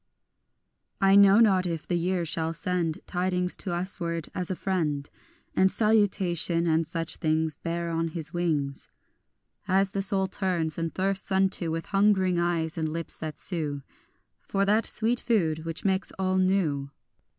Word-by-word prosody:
2 - - +2
I 195 0 +6
know 200 +1 +7
not 190 -5 +4
if 165 -3 -4
the - - -2
year 175 0 0
shall 160 +1 -2
send 170 -2 -2
Tidings 180 0 -1
to - - -7
usward 175 -2 -3
as 180 -1 -2
a 185 - -1
friend, 155 -7 -2 0.5
And 190 0 +4
salutation, 185 -6 +2
and 160 -1 +1
such 165 -2 -4
things 155 -1 0
Bear 170 0 -3
on 165 0 -1
his 160 0 -5
wings 150 -6 -1 0.8
As 195 +1 +2
the 195 - -1
soul 195 -1 +5
turns 175 -5 -2
and 165 -1 -2
thirsts 195 +1 -1
unto 190 -3 +1
With 165 +1 -3
hungering 195 -3 +2
eyes 170 -1 -1
and 160 -1 -1
lips 165 +1 -4
that 155 -1 -5
sue 150 -6 -3 0.6
For 195 0 -1
that 215 +3 +2
sweet 235 +2 0
food 165 -9 0
which 165 +3 -5
makes 190 0 0
all 190 0 +1
new. 170 -8 +1
175 Hz, 160 wpm, -27 LUFS, 165-190 Hz, 0.8 s, know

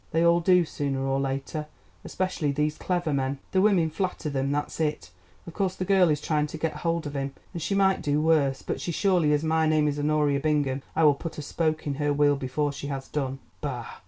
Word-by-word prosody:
They 165 +2 +2
all 170 0 +5
do 180 0 +4
sooner 140 -3 -2
or 135 0 0
later, 135 +3 -3 0.4
especially 185 -6 -1
these 150 +2 0
clever 175 -4 -1
men. 135 0 -1
The 190 - +3
women 185 -6 +3
flatter 180 -3 -3
them, 135 0 -1
that's 145 +2 -2
it. 150 - -2 0.3
Of 170 - -9
course 190 -1 -1
the 185 - -3
girl 190 -2 +4
is 150 -1 +1
trying 150 0 0
to 160 - -7
get 160 0 -2
hold 165 -1 -1
of 145 0 -5
him, 135 0 -3 0.2
and 170 - -5
she 195 +5 -1
might 190 -1 +3
do 145 0 +1
worse, 150 -4 +2
but - - -3
so 175 - -2
surely 175 -3 +2
as 150 +1 +2
my 160 0 +2
name 155 -1 +3
is 145 0 -1
Honoria 145 -1 +2
Bingham 145 -3 0
I 165 - +3
will 150 -2 +7
put 165 +3 -7
a 150 - -5
spoke 155 +1 -1
in 145 - -1
her 145 0 +2
wheel 145 0 +3
before 140 +2 -1
she 140 0 -6
has 135 -2 -5
done. 135 -3 -2 0.2
Bah! 125 -5 -4
150 Hz, 230 wpm, -26 LUFS, 140-165 Hz, 0.4 s, will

